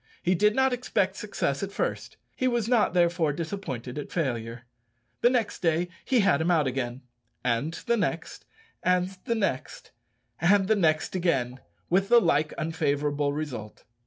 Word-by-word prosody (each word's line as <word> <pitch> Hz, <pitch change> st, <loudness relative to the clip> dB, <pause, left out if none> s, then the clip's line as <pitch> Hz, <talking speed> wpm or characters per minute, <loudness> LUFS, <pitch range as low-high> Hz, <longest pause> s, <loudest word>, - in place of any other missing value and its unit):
He 180 Hz, -, +3 dB
did 210 Hz, +4 st, +3 dB
not 265 Hz, -1 st, +3 dB
expect 205 Hz, -6 st, 0 dB
success 200 Hz, -10 st, -2 dB
at 195 Hz, 0 st, -3 dB
first; -, -, -3 dB, 0.2 s
he 255 Hz, -, 0 dB
was 240 Hz, -3 st, 0 dB
not 230 Hz, -6 st, +2 dB
therefore 170 Hz, -3 st, +3 dB
disappointed 150 Hz, -, -5 dB
at 145 Hz, -, -7 dB
failure. 120 Hz, -7 st, -2 dB, 0.6 s
Next 240 Hz, -3 st, +2 dB
day 170 Hz, 0 st, +1 dB
he 255 Hz, -4 st, +3 dB
had 160 Hz, -6 st, +3 dB
him 165 Hz, -, +1 dB
out 165 Hz, -4 st, +3 dB
again 130 Hz, -1 st, -3 dB, 0.4 s
and 125 Hz, +7 st, 0 dB
the 235 Hz, -1 st, +2 dB
next 210 Hz, -, -3 dB, 0.4 s
and 180 Hz, 0 st, +2 dB, 0.2 s
the 230 Hz, -, 0 dB
next 190 Hz, -, -3 dB, 0.5 s
and 195 Hz, +3 st, +4 dB
the 220 Hz, -, +4 dB
next 155 Hz, -6 st, +1 dB
again, 135 Hz, -9 st, 0 dB, 0.3 s
with 195 Hz, +3 st, +2 dB
the 240 Hz, 0 st, +8 dB
like 150 Hz, -7 st, +2 dB
unfavourable 145 Hz, -2 st, 0 dB
result. 140 Hz, -8 st, -6 dB
170 Hz, 155 wpm, -27 LUFS, 140-200 Hz, 0.6 s, the